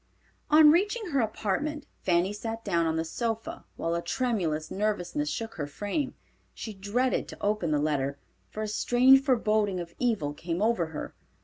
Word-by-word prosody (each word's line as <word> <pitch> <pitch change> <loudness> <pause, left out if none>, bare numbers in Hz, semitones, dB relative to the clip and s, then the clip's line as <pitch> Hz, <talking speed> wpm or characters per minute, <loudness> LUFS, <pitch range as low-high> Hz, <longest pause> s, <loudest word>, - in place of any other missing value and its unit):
On 305 0 +8
reaching 405 +3 +1
her 275 - +2
apartment, 260 +7 -1 0.2
Fanny 180 +2 +2
sat 225 +2 -5
down 170 -1 +1
on 160 - 0
the 160 0 -1
sofa, 225 +6 -3
while 165 - -2
a 170 - 0
tremulous 170 -7 -1
nervousness 210 +7 -1
shook 225 -1 -4
her 145 -3 -3
frame. 205 - -3 0.4
She 220 - -6
dreaded 210 +7 0
to - - -9
open 205 -4 0
the 150 - +2
letter, 140 -2 0 0.3
for 215 - -5
a - - -2
strange 250 +5 +5
forboding 215 -7 +1
of 170 -1 -7
evil 215 -13 0
came 165 +3 -4
over 210 -5 +2
her. 160 - -6
210 Hz, 170 wpm, -28 LUFS, 170-245 Hz, 0.4 s, On